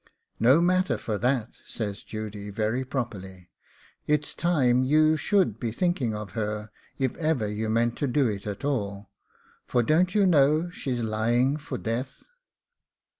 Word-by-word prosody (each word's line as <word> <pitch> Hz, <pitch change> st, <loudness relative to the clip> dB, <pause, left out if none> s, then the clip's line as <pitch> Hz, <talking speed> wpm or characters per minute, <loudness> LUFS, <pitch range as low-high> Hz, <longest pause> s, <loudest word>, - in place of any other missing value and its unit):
'No 130 Hz, +8 st, +5 dB
matter 185 Hz, +1 st, +2 dB
for 105 Hz, -3 st, -3 dB
that,' 125 Hz, -2 st, -1 dB
says 105 Hz, -3 st, -5 dB
Judy, 105 Hz, -1 st, -6 dB
very 110 Hz, +5 st, -1 dB
properly; 95 Hz, -9 st, -6 dB, 0.6 s
'it's 150 Hz, 0 st, +1 dB
time 135 Hz, -8 st, +2 dB
you 155 Hz, +3 st, +4 dB
should 175 Hz, -, +1 dB
be 115 Hz, -, -2 dB
thinking 130 Hz, -, 0 dB
of 105 Hz, -2 st, -6 dB
her, 105 Hz, 0 st, -3 dB, 0.3 s
if 130 Hz, -3 st, -1 dB
ever 155 Hz, -9 st, 0 dB
you 105 Hz, +1 st, -3 dB
mean 115 Hz, +1 st, +2 dB
to 140 Hz, -, -2 dB
do 135 Hz, +1 st, +2 dB
it 105 Hz, -2 st, -4 dB
at 105 Hz, +6 st, -5 dB
all, 100 Hz, -7 st, -3 dB, 0.6 s
for 120 Hz, -, +2 dB
don't 175 Hz, -, +2 dB
you 205 Hz, -2 st, +4 dB
know 155 Hz, 0 st, +3 dB
she's 125 Hz, -8 st, -3 dB
lying 120 Hz, +5 st, +1 dB
for 150 Hz, -3 st, -5 dB
death? 125 Hz, +5 st, -4 dB
120 Hz, 150 wpm, -26 LUFS, 110-150 Hz, 0.6 s, No